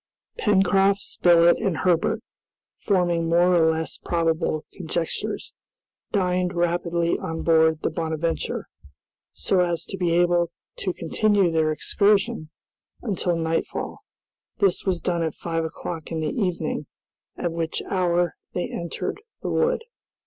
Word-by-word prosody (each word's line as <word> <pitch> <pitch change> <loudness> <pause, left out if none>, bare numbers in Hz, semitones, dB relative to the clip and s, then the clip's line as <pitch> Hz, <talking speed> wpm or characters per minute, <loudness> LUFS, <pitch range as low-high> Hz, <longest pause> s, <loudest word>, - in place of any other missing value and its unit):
Pencroft, 195 -1 +3
Spilett, 170 -1 +4
and 195 -7 0
Herbert, 175 -3 +1 0.6
forming 175 -4 +1
more 175 +2 +4
or 160 -1 +5
less 160 0 -4
probable 165 -2 0
conjectures, 170 -2 -3 0.6
dined 180 -2 +1
rapidly 170 0 +1
on 160 0 -4
board 160 -1 +4
the - - +1
"Bonadventure" 160 0 -2 0.7
so 190 - 0
as 170 -2 0
to 195 - -6
be 175 -2 +1
able 175 -1 +3 0.3
to 185 - -1
continue 195 +2 +2
their 160 -1 +2
excursion 200 +2 +1 0.5
until 190 -6 0
nightfall. 165 0 -2 0.6
This 195 -3 +2
was 185 -3 0
done 175 -2 0
at 160 -2 -1
five 165 -1 -2
o'clock 165 0 -6
in 165 - -2
the 155 - -1
evening, 170 -7 -2 0.5
at 175 - -1
which 165 -1 -2
hour 175 -2 +1 0.2
they 180 - -2
entered 170 - -4 0.2
the - - -2
wood. 480 0 +1
170 Hz, 125 wpm, -24 LUFS, 165-185 Hz, 0.7 s, or